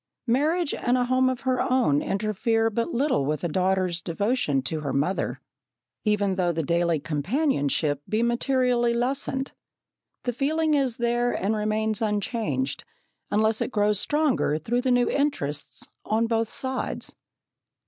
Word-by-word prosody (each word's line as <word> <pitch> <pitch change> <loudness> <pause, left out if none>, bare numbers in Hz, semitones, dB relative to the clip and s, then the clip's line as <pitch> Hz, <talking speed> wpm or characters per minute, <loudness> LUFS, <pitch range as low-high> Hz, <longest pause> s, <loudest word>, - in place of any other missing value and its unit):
Marriage 295 +7 +1
and 245 +1 +1
a 250 - +2
home 255 +1 +3
of 255 -1 -3
her 260 -2 +1
own 245 - +2
interfere 220 +3 0
but 230 +2 -1
little 255 - +1
with 150 +4 -2
a - - +1
daughter's 185 0 0
devotion 170 - 0
to 155 +4 -2
her 145 -2 -3
mother, 140 -4 -1 0.7
even 205 -3 +1
though 175 -2 +2
the 165 -1 -2
daily 170 +1 +1
companionship 150 - 0
be 220 +2 +1
materially 240 0 +2
lessened. 265 +2 0 0.7
The 245 - -1
feeling 310 +5 +1
is 270 -5 +1
there 240 +1 +1
and 205 +4 0
remains 215 +1 0
unchanged, 225 +4 -1 0.5
unless 220 +1 +2
it - - 0
grows 210 -2 +2
stronger 295 - +1
through 235 +10 -1
the 260 - 0
new 245 -1 +3
interests 150 - -2 0.2
on 220 +2 +1
both 225 -1 0
sides. 260 -1 -3
225 Hz, 145 wpm, -25 LUFS, 185-255 Hz, 0.7 s, home